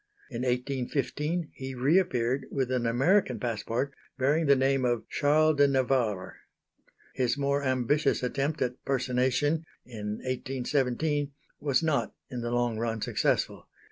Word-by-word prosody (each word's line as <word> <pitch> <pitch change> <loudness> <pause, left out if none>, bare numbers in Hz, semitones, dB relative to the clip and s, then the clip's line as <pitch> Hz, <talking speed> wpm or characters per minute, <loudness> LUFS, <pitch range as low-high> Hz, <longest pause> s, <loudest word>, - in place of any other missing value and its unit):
In 120 -1 -4
1815 140 +6 -1
he 130 0 -6
re 140 +9 +4
appeared 130 -7 -1
with 130 -2 -1
an 125 -2 +1
American 150 - +2
passport 120 +3 -2 0.2
bearing 145 +4 +2
the 140 - +7
name 135 0 +2
of 120 -2 0
Charles 155 +1 +3
de 145 0 +6
Navarre. 125 -8 0 0.8
His 130 0 0
more 140 0 0
ambitious 130 +2 +1
attempt 140 +4 0
at 125 0 -4
personation 130 +4 +1 0.2
in 105 -4 -5
1817, 135 +3 -1 0.3
was 140 0 +1
not 155 -3 0 0.2
in 125 -1 -4
the 120 - -2
long 120 -2 0
run 115 -1 -1
successful. - - 0
130 Hz, 135 wpm, -28 LUFS, 125-145 Hz, 0.8 s, the